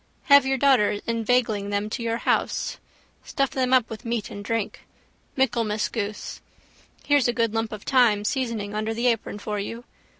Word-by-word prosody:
Have 280 Hz, -2 st, +6 dB
your 270 Hz, 0 st, +1 dB
daughters 240 Hz, -6 st, +3 dB
inveigling 230 Hz, -3 st, 0 dB
them 205 Hz, +1 st, -1 dB
to 240 Hz, -, -3 dB
your 230 Hz, 0 st, -1 dB
house. -, -, -1 dB, 0.4 s
Stuff 275 Hz, -1 st, -1 dB
them 255 Hz, -1 st, 0 dB
up 255 Hz, -3 st, +4 dB
with 225 Hz, +1 st, -8 dB
meat 230 Hz, -2 st, -3 dB
and 205 Hz, -, -7 dB
drink. 225 Hz, 0 st, -2 dB, 0.6 s
Michaelmas 230 Hz, -5 st, +1 dB
goose. 210 Hz, -2 st, -5 dB, 0.6 s
Here's 290 Hz, -4 st, +3 dB
a 240 Hz, -, +1 dB
good 230 Hz, -1 st, 0 dB
lump 225 Hz, 0 st, -1 dB
of 215 Hz, -2 st, -7 dB
thyme 230 Hz, -6 st, +3 dB
seasoning 230 Hz, -5 st, -2 dB
under 215 Hz, +1 st, -2 dB
the 235 Hz, +2 st, -2 dB
apron 230 Hz, -3 st, 0 dB
for 210 Hz, 0 st, -4 dB
you. 230 Hz, +4 st, -5 dB
230 Hz, 170 wpm, -24 LUFS, 210-250 Hz, 0.6 s, Have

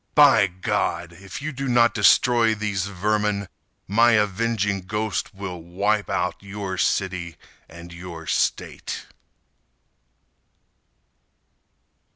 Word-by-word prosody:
By 145 Hz, -8 st, +7 dB
God! 90 Hz, -1 st, -2 dB
If 95 Hz, +8 st, -9 dB
you 155 Hz, -, -2 dB
do 135 Hz, 0 st, -4 dB
not 120 Hz, -1 st, +4 dB
destroy 115 Hz, +3 st, +4 dB
these 105 Hz, -3 st, -2 dB
vermin 105 Hz, +1 st, -1 dB, 0.4 s
My 115 Hz, +4 st, +4 dB
avenging 105 Hz, -1 st, +1 dB
ghost 105 Hz, +1 st, -2 dB
will 95 Hz, -3 st, -7 dB
wipe 100 Hz, +5 st, -1 dB
out 90 Hz, -1 st, -1 dB
Your 100 Hz, -1 st, -5 dB
city 90 Hz, -4 st, -1 dB, 0.3 s
and 85 Hz, +1 st, -11 dB
your 85 Hz, -2 st, -9 dB
state. -, -, -2 dB
100 Hz, 100 wpm, -23 LUFS, 90-110 Hz, 0.4 s, By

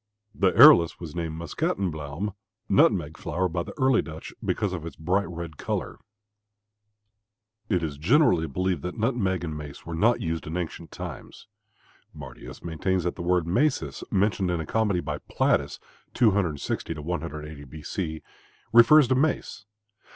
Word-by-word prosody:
The 95 Hz, -2 st, +2 dB
arillus 120 Hz, -, +7 dB
was 80 Hz, -4 st, -8 dB
named 80 Hz, -2 st, -4 dB
Muscatenbluome 85 Hz, +2 st, -3 dB, 0.3 s
(nutmeg 80 Hz, -3 st, +3 dB
flower) 95 Hz, +1 st, -1 dB
by 85 Hz, 0 st, -2 dB
the -, -, -8 dB
early 130 Hz, -3 st, +4 dB
Dutch 80 Hz, 0 st, -9 dB
because 100 Hz, -3 st, -1 dB
of 85 Hz, -4 st, -5 dB
its 85 Hz, -3 st, -7 dB
bright 90 Hz, +6 st, 0 dB
red 85 Hz, -3 st, -7 dB
color. -, -, -4 dB, 1.7 s
It 90 Hz, -5 st, +1 dB
is 75 Hz, -3 st, -4 dB
generally 90 Hz, -, +3 dB
believed 90 Hz, +1 st, -1 dB
that 90 Hz, +8 st, -5 dB
nutmeg 110 Hz, -6 st, 0 dB
and 80 Hz, -2 st, -4 dB
mace 75 Hz, -1 st, -9 dB
were 85 Hz, -, -6 dB
not 110 Hz, +9 st, +3 dB
used 80 Hz, -1 st, -3 dB
in 80 Hz, +3 st, -3 dB
ancient 85 Hz, -1 st, -5 dB
times. -, -, -8 dB, 0.7 s
Martius 65 Hz, +2 st, -10 dB
maintains 90 Hz, +2 st, -1 dB
that 90 Hz, -, -1 dB
the -, -, -7 dB
word 90 Hz, -1 st, +1 dB
macis 95 Hz, -, 0 dB
mentioned 100 Hz, -1 st, +1 dB
in 90 Hz, -1 st, 0 dB
a 80 Hz, -, -3 dB
comedy 105 Hz, -2 st, +1 dB
by -, -, -4 dB
Plautus 70 Hz, 0 st, 0 dB, 0.4 s
(260 95 Hz, -, +1 dB
180 75 Hz, -2 st, -5 dB
B. 75 Hz, +3 st, -11 dB
C.) 80 Hz, -2 st, -4 dB, 0.5 s
refers 125 Hz, +5 st, +7 dB
to 130 Hz, -, +2 dB
mace. 130 Hz, -7 st, -1 dB
85 Hz, 150 wpm, -26 LUFS, 80-100 Hz, 1.7 s, arillus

